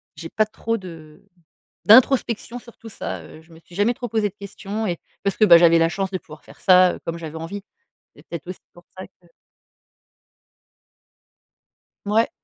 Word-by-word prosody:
j'ai 165 +2 -8
pas 215 - +1
trop 230 +1 -3
de 160 -6 -12 0.6
d'introspection 240 0 +4
sur 235 -1 -16
tout 225 - -11
ça. - - -6
Heu, 155 - -14
je 165 +1 -22
me 160 - -15
suis 170 +1 -19
jamais 205 +5 +1
trop 245 0 -6
posée 215 -1 0
de - - -36
questions 200 +2 -5
et 175 -3 -2 0.3
parce 200 - -1
que, 215 - +4
bah, 170 -3 +9
j'avais 170 -1 +5
la 165 0 +3
chance 195 +1 -3
de 185 - -2
pouvoir 155 -2 -15
faire - - -17
ça, 185 -1 +5
heu, - - -11
comme 165 0 -4
j'avais 160 -2 -8
envie. 170 +5 -6 0.5
C'est - - -18
peut-être 170 -2 -7
aussi 185 - -7
pour 175 - -17
ça 185 - -8
que 175 - -30 2.8
Mouais. 215 +3 +2
185 Hz, 190 wpm, -22 LUFS, 170-215 Hz, 2.8 s, bah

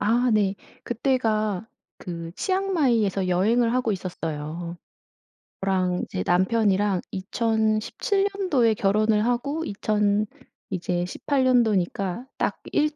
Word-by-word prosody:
아. 240 +3 +2
네. 200 -2 +2 0.3
그때가 225 -5 0 0.3
그 170 -2 -6
치앙마이에서 265 - +1
여행을 230 +6 +2
하고 250 -3 +1
있었어요. 170 -2 -5 0.9
저랑 185 -2 +1
이제 90 - -4
남편이랑 195 0 +2
2017 220 - 0
년도에 280 - +2
결혼을 210 +1 +2
하고 280 +6 -1
2000 210 -2 +1 0.4
이제 180 -1 -1
18 270 +8 -1
년도니까 215 -4 +1
딱 - - -1
1 300 0 +1
215 Hz, 205 characters per minute, -25 LUFS, 185-240 Hz, 0.9 s, 아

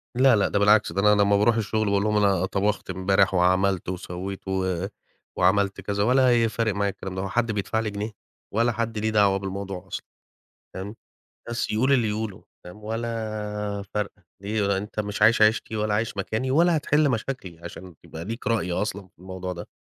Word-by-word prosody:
لا، 130 -1 +5
لأ 100 - +2
ده 100 - +1
بالعكس، 105 +1 +4
ده 95 - 0
أنا 105 - +3
لمّا 100 0 +4
بارُوح 115 +3 +3
الشغل 110 0 0
باقول 100 0 +2
لهم 105 0 +1
أنا 100 -3 +3
طَبَخت 100 +1 -1
إمبارح 95 +1 +2
وعملت 95 0 +2
وسوّيت 95 +2 -6
و 95 -1 -1 0.5
وعملت 100 +2 +2
كذا 100 0 -1
ولا 125 0 +4
ه - - +2
فارق 110 -2 -1
معايا 100 0 0
الكلام 95 -1 -7
ده، 95 - -2
هو 95 - -3
حد 115 0 0
بيدفعلي 110 +2 -1
جنيه 105 +2 -4 0.4
ولا 115 +3 +2
حد 115 -1 -3
ليه 110 +1 0
دعوة 100 -2 +3
بالموضوع 95 -1 -5
أصلًا، - - -6 0.7
فاهم، 100 +3 -6 0.6
بس، 120 -2 -2
يقول 130 +6 +2
اللي 115 -5 +2
يقوله، 105 -2 -4 0.2
فاهم، 95 +4 -12
ولا 105 -2 -3
فارقة، 105 -2 -3 0.2
ليه 105 +1 -1
هو 100 - +1
أنت 105 +2 -5
مش 105 0 -3
عايش 110 +1 +5
عيشتي 110 +1 +3
ولا 105 -1 0
عايش 105 -1 -1
مكاني 110 +6 -2
ولا 170 +3 +4
هتحِلّ 150 0 +2
مشاكلي 110 -8 -4
عشان 85 0 -10
يبقى 80 +1 -8
ليك 115 +4 -5
رأي 110 -6 0
أصلًا 100 0 -2
في 85 - -37
الموضوع 95 0 -6
ده. 85 - -8
105 Hz, 190 wpm, -25 LUFS, 95-110 Hz, 0.7 s, لا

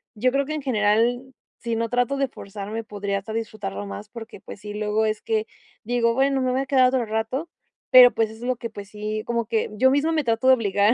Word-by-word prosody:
yo 250 +4 +1
creo 275 +1 +1
que 305 - -4
en 305 - -3
general, 230 -1 +2 0.4
si 235 -1 -3
no 230 0 -1
trato 245 +3 0
de 275 0 +1
forzarme, 210 -1 -7
podría 200 -2 -3
hasta 220 +3 -8
disfrutarlo 215 - -4
más, 100 +1 -8
porque, 225 -3 -10
pues - - -10
sí, 210 0 -7
luego 210 +1 0
es 215 -1 -1
que 220 -1 -1 0.4
digo: 235 0 +1
"Bueno, 270 +2 +2
me 255 -1 +1
voy 255 - 0
a - - -3
quedar 260 -1 +4
otro 255 -2 0
rato". 225 +9 -3 0.4
Pero, 250 -1 +10
pues, 225 -1 +1
es 220 +1 -12
lo 250 +1 -1
que, 230 - -6
pues, 205 -2 -10
sí, 215 +1 -4
como 235 -1 -1
que 225 0 -1
yo 255 +5 +4
misma 285 +4 +2
me 315 -2 +1
trato 230 +2 +1
de 260 - +8
obligar, 205 -1 +2
225 Hz, 235 wpm, -23 LUFS, 210-255 Hz, 0.4 s, Pero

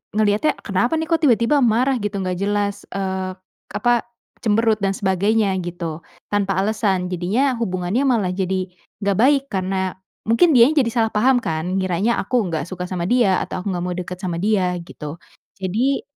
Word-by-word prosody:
ngeliatnya, 215 +7 +2
"Kenapa 235 - +1
nih 320 0 -2
kok 330 - +2
tiba-tiba 240 +2 +4
marah?" 250 +2 +3
Gitu, 205 0 -3
gak 180 -1 -2
jelas, 205 0 -1
eee, 190 -1 -2 0.3
k - - -19
apa 240 +1 +2 0.4
cemberut 220 0 +2
dan 195 0 0
sebagainya 200 +2 +1
gitu. 170 -2 -5 0.3
Tanpa 195 -2 0
alasan. 195 -3 0
Jadinya 220 +10 +1
hubungannya 185 +4 -1
malah 210 -8 +2
jadi 190 0 -1 0.4
nggak 200 -1 +1
baik 275 +3 +4
karena 190 0 -1 0.3
mungkin 310 +9 +4
dianya 285 +5 +6
jadi 230 -2 -1
salah 225 -2 +1
paham 250 +4 +4
kan? 165 +4 -2
Ngiranya 190 +5 0
aku 240 +4 +1
nggak 160 -2 -2
suka 180 -1 -5
sama 175 -2 -2
dia 200 -4 +3
atau - - -5
aku 200 - -7
nggak 175 -1 -2
mau 180 - -2
deket 180 0 -5
sama 180 -3 -3
dia 195 -4 +1
gitu. 160 -1 -9 0.4
Jadi 235 +9 0
200 Hz, 170 wpm, -21 LUFS, 185-230 Hz, 0.4 s, dianya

